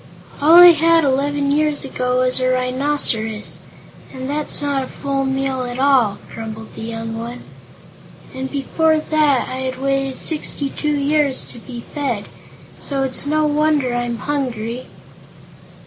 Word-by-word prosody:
"All 315 +3 +6
I 355 0 +11
had, 330 0 +3
eleven 280 +1 +1
years 300 -1 +1
ago, 250 -1 -1
was 255 0 0
a 255 - +1
rhinoceros, 255 -4 0 0.5
and 260 0 -6
that's 295 +1 -1
not 285 -2 -1
a 260 - -5
full 275 -1 -3
meal 265 -1 -1
at 245 0 -5
all," 260 -7 +3 0.2
grumbled 220 0 -8
the - - -9
young 225 0 -5
one. 235 +2 -7 0.9
"And, 265 0 -5
before 315 +3 +1
that, 305 -4 +1
I 255 - -5
had 260 0 -4
waited 270 -1 -1
sixty 295 -3 0
two 300 -1 -1
years 285 -1 +1
to - - -5
be 240 +1 -9
fed; 255 -9 -2 0.5
so 275 -2 -1
it's 265 +1 0
no 310 +1 +2
wonder 295 -3 +1
I'm 240 -1 -2
hungry." 245 -2 -3
270 Hz, 145 wpm, -19 LUFS, 250-290 Hz, 0.9 s, I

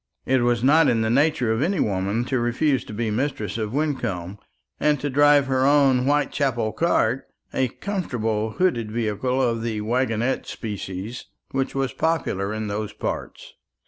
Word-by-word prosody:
It 130 -1 +2
was 120 -1 +1
not 155 +5 +5
in 115 -2 +2
the 110 0 +1
nature 135 -3 +2
of 110 - -1
any 180 +3 +1
woman 100 +4 0
to 130 0 0
refuse 125 +4 +1
to - - -9
be 110 0 -2
mistress 110 -3 -2
of 105 -1 -2
Wyncomb, 105 - -2 0.4
and 150 -2 +2
to 145 +1 -2
drive 145 +1 +5
her 130 -1 +1
own 135 -3 +4
whitechapel 135 -5 +1
cart 125 -4 +1 0.3
a 130 - +1
comfortable 115 - -2
hooded 120 -13 +1
vehicle 115 +3 -1
of 115 -3 +1
the 110 -2 -2
wagonette 120 +2 0
species, 105 +1 -6 0.3
which 135 0 -2
was 135 -1 -1
popular 105 - -1
in 110 0 -3
those 105 +1 -3
parts. - - -5
120 Hz, 160 wpm, -23 LUFS, 110-140 Hz, 0.4 s, not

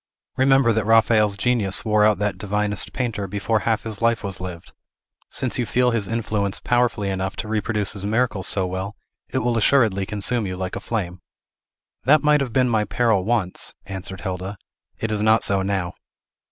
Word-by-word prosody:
Remember 135 -2 +4
that 110 -1 -1
Raphael's 110 -2 +4
genius 110 -3 0
wore 105 -1 +3
out 105 -1 +4
that 100 -2 -2
divinest 105 0 -1
painter 115 -6 -3
before 105 +3 0
half 110 0 +1
his 110 -2 -6
life 115 -1 +2
was 95 -2 -4
lived. 90 -1 -8 0.6
Since 130 -1 -1
you 120 - -1
feel 125 0 +2
his 110 -4 -1
influence 105 -3 -2
powerfully 120 -5 +1
enough 95 +1 -3
to 110 - -4
reproduce 105 -1 -1
his 100 -2 -3
miracles 105 -2 0
so 95 -2 +3
well, 95 +3 -4 0.3
it - - -3
will 120 -1 +1
assuredly 110 -6 +3
consume 105 +1 0
you 90 -1 -4
like 95 0 -4
a - - -3
flame." 95 -5 -4 0.8
"That 150 +4 +5
might 150 -1 +4
have 130 -3 -2
been 130 +1 +3
my 110 -3 +2
peril 105 -2 +1
once," 110 -5 -1
answered 95 0 -6
Hilda. 95 +2 -4 0.4
"It 110 - -3
is 105 -1 0
not 110 +1 +4
so 100 -1 +2
now." 95 -2 -2
105 Hz, 180 wpm, -22 LUFS, 95-115 Hz, 0.8 s, That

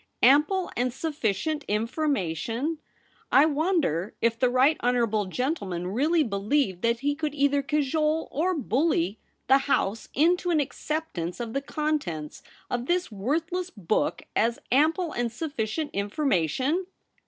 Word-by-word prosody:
Ample 300 +9 +4
and 250 +1 0
sufficient 295 - -2
information! 230 - -1 0.5
I 280 - +7
wonder 300 - 0
if 230 0 +1
the 250 - +3
right 260 +5 +4
honourable 235 -4 +1
gentleman 190 - -2
really 305 - +2
believed 200 -2 0
that 235 0 +1
he 290 +1 +1
could 300 -1 -3
either 285 0 +2
cajole 305 +2 0
or 355 +5 0
bully 245 - 0 0.3
the 270 +2 +5
House 225 -6 -1
into 350 +5 +3
an 330 -3 +3
acceptance 285 - -3
of 230 -2 -4
the 275 - -1
contents 275 - -3 0.3
of 245 +1 -3
this 355 -5 0
worthless 325 - -2
book 205 - -1
as 230 +1 +2
ample 315 +6 +3
and 240 -3 -2
sufficient 285 +1 -3
information 260 - 0
275 Hz, 130 wpm, -26 LUFS, 220-310 Hz, 0.5 s, I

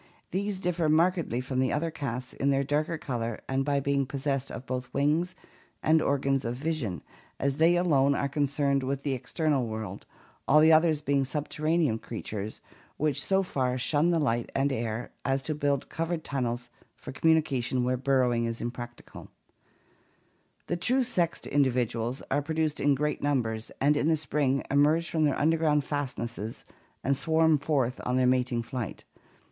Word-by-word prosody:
These 200 +1 -2
differ 175 -3 0
markedly 165 -5 +2
from 130 0 -3
the 130 -1 +2
other 165 +2 -1
castes 125 -4 -4
in 140 - 0
their 140 0 +2
darker 150 +4 0
color 115 -6 -3
and 135 0 0
by 140 0 +1
being 140 -1 0
pos 135 0 -6
sessed 140 -2 0
of 130 - -7
both 125 0 -4
wings 155 +7 +1 0.5
and 155 0 +4
organs 135 -1 +1
of 115 +1 -2
vision, 130 - -3 0.4
as 140 0 0
they 165 +2 +5
alone 140 -6 +3
are 140 - 0
concerned 140 -1 +1
with 135 +1 -3
the 140 - 0
external 135 0 0
world, 110 -3 -6 0.4
all 150 - +5
of 155 - +7
the 160 - +7
others 155 -1 +4
being 140 -2 +1
subterranean 150 -2 0
creatures 110 -2 -6 0.4
which 145 -2 +1
so 195 0 +2
far 130 -7 -1
shun 145 +6 +2
the 170 - +2
light 120 -6 0
and 140 +1 +2
air 115 -1 -3
as 135 0 0
to 155 - -1
build 145 -2 0
covered 165 0 -2
tunnels 120 -4 -3 0.2
for - - -9
commu 160 +3 +4
nication 130 -4 -1
where 125 +1 +1
burrowing 125 -2 +2
is 115 0 -3
impracticable. 120 0 -7 1.4
The 175 - -2
true 255 +8 +3
sexed 180 -9 -1
individuals 125 -3 0
are 145 +2 +2
produced 155 0 -1
in 145 -1 +3
great 150 +2 -1
numbers, 115 -6 -1
and 145 +2 +3
in 145 +1 +1
the 160 -1 +3
spring 145 -3 0
emerge 150 +4 +3
from 160 -2 +2
their 145 - +1
underground 155 -1 +2
fastnesses 120 -6 -4 0.4
and 140 +2 +2
swarm 160 +1 +3
forth 135 -4 0
on 125 - 0
their 130 - +3
mating 125 -2 +1
flight. 125 -4 -5
140 Hz, 170 wpm, -28 LUFS, 125-155 Hz, 1.4 s, of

